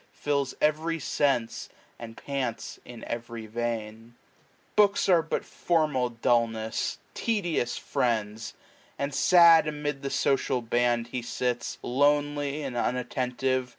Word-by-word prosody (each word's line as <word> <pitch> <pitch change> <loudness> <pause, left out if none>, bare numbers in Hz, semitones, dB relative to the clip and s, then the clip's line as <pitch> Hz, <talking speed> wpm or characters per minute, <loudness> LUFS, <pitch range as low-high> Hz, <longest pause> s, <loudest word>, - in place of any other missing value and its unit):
Fills 140 -3 -1
every 155 +2 +1
sense> 135 -5 0 0.3
and 115 -1 -9
pants 135 -5 -4
in 120 -2 -11
every 115 -1 -6
vein. 115 0 -4 0.6
Books 205 -1 +4
are 175 -3 +5
but 165 - -3
formal 155 -7 0
dullness, 115 -2 0 0.2
tedious 175 - -1
friends; 110 -2 -2 0.4
And 140 0 -2
sad 170 0 +6
amid 150 -2 -3
the 140 - -3
social 135 -2 +1
band 120 0 +1
he 125 0 -3
sits, 120 0 -2
\ - - -35
Lonely, 145 +2 +1
and 135 -3 -5
unattentive. 125 +1 -1
130 Hz, 120 wpm, -27 LUFS, 120-145 Hz, 0.6 s, sad